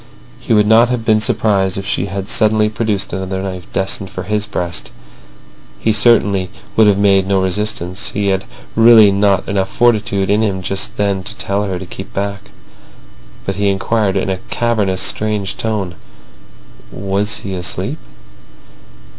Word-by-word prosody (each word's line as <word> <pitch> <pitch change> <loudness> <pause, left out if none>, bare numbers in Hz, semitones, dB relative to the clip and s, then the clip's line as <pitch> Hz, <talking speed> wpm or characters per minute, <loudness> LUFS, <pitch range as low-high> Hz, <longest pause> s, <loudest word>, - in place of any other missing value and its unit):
He - - -6
would 105 -2 +5
not 115 +3 +5
have 125 -2 -2
been 110 -1 +3
surprised 100 -4 +1
if 100 - -4
she 100 - -1
had 100 0 -5
suddenly 110 -1 +3
produced 105 -4 -2
another 95 0 -3
knife 95 -2 -6
destined 95 0 -2
for - - -6
his 105 +2 -2
breast. 85 -1 -3 0.9
He 110 - +1
certainly 105 -4 +3 0.3
would 110 -1 +5
have 100 -1 +4
made 100 -1 +3
no 100 -1 +2
resistance. 95 -1 -2
He 100 -1 -1
had 95 0 0 0.3
really 115 -2 +7
not 100 -1 +2
enough 95 -1 -1
fortitude 105 -4 +1
in 105 +2 +3
him 95 -4 -1
just 95 +1 -2
then 100 -2 0
to 95 - -8
tell 100 +1 -2
her 95 -2 -3
to 95 - -7
keep 95 +2 -10
back. 100 0 -4 1.0
But 95 -1 -3
he 100 0 +2
inquired 100 +1 0
in 95 - -1
a 95 - -2
cavernous, 105 -6 0
strange 105 -2 -1
tone: 105 -6 -2 1.0
"Was 100 +2 -1
he 95 - -4
asleep?" 90 -1 -2
100 Hz, 160 wpm, -16 LUFS, 95-105 Hz, 1.0 s, really